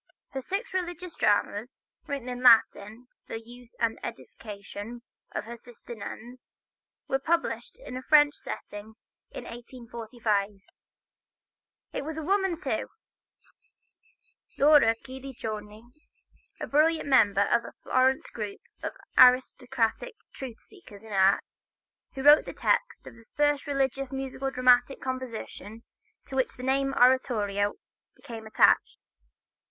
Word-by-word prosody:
Her 265 - -5
six 400 - -4
religious 355 -1 -4
dramas, 205 +3 0 0.3
written 275 -3 -4
in 250 0 -5
Latin 225 -1 +4 0.2
for - - -8
the 225 - -3
use 240 +1 -15
and 230 -1 0
edification 215 +1 -8 0.3
of - - -4
her 235 +1 -7
sister 240 0 -12
nuns, 235 +3 -9 0.6
were 270 - 0
published 330 +4 -1
in 280 - -9
a 255 - -4
French 295 +1 +5
setting, 210 -4 -8 0.3
in - - -8
1845. 230 -3 -3 1.4
It - - -3
was 315 +2 -5
a 320 - -4
woman, 385 -1 +1
too, 375 - -2 1.7
Laura 280 -6 +6
Guidiccioni, 225 -5 -7 0.8
a - - -3
brilliant 315 +2 +2
member 205 -7 +4
of 235 +3 +3
the 230 - -11
Florence 260 +1 +2
group 210 -3 -6 0.2
of - - -4 0.3
aristocratic 255 - +3 0.2
truth 250 -4 -8
seekers 225 - -15
in 220 -2 -9
art, 190 0 +4 0.7
who 265 - -4
wrote 295 +1 +7
the - - -7
text - - 0
of - - -10
the 230 -1 -18
first 290 -1 +2
religious 275 -1 -1
musical 270 0 -3
dramatic 250 0 +3
composition 235 -4 -6 0.4
to 270 - -8
which 260 -1 +1
the 250 - -10
name 270 +1 +1
oratorio 215 -6 +2 0.4
became 225 -2 -9
attached. 220 - +3
250 Hz, 125 wpm, -28 LUFS, 225-275 Hz, 1.7 s, wrote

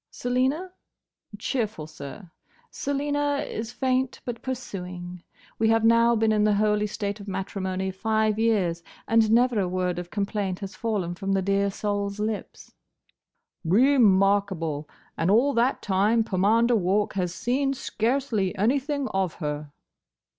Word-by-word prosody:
"Selina? 260 +9 -1 0.7
Cheerful, 215 - -2
sir. 155 +4 -10 0.4
Selina 285 0 -1
is 225 +1 -5
faint 260 0 0
but 240 -2 -5
pursuing. 180 -8 -6 0.4
We 220 0 +3
have 225 0 +3
now 230 +1 +5
been 220 0 +2
in 210 -1 +2
the 210 -1 +3
holy 210 0 +2
state 205 0 -4
of 200 - -10
matrimony 190 0 -3
five 215 +2 0
years, 195 -7 +1 0.3
and 225 -1 +4
never 240 0 +3
a 190 - +1
word 180 -1 -1
of 175 0 -7
complaint 200 -2 -2
has 195 -1 -7
fallen 195 -4 -2
from 195 +2 -2
the 195 -1 +1
dear 200 +1 +1
soul's 200 0 -3
lips." 215 0 -4 0.9
"Re 250 - +4
markable! 190 -7 +2 0.3
And 165 - +1
all 245 +8 +4
that 245 +2 +1
time 210 +4 +2
Pomander 220 +5 +2
Walk 205 +2 +1
has 180 -3 -1
seen 270 +8 0
scarcely 225 -5 -1
anything 275 +6 0
of 190 -3 -1
her." 150 -2 -4
210 Hz, 140 wpm, -25 LUFS, 190-235 Hz, 0.9 s, now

